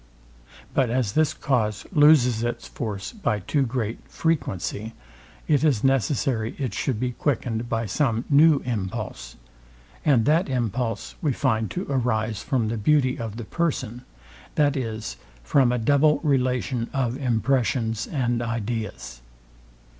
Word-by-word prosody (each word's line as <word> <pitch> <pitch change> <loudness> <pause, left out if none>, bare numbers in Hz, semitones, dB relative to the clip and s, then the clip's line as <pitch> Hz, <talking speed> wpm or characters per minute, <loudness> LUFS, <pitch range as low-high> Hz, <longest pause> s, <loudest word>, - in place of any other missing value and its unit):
But 130 -3 +2
as 120 -4 0
this 155 +6 +2
cause 110 -7 -1
loses 145 - +5
its 120 0 -3
force 105 -5 -5
by 155 - -1
too 105 +9 -1
great 120 -3 -2
frequency, 110 - -2 0.5
it 145 -1 +3
is 140 -9 +2
necessary 130 -3 +1
it 130 -7 -3
should 110 +5 -1
be 125 0 -1
quickened 120 -3 -2
by 115 -1 -1
some 115 +3 0
new 150 0 +5
impulse; 105 - -4 0.7
and 125 -7 +3
that 160 +2 +3
impulse 120 -2 -2
we 150 -5 +1
find 110 -2 0
to 185 +1 -4
arise 115 -5 0
from 120 -5 0
the 115 - -2
beauty 130 +3 +2
of 115 -2 -5
the 120 - -6
person; 130 -8 -2 0.5
that 145 -1 +3
is, 110 - -4 0.3
from 125 - +3
a 125 - +1
double 145 +6 +3
relation 125 -4 0
of 125 -3 0
impressions 120 -3 0
and 120 -5 -1
ideas. 110 - -4
120 Hz, 135 wpm, -24 LUFS, 110-140 Hz, 0.7 s, loses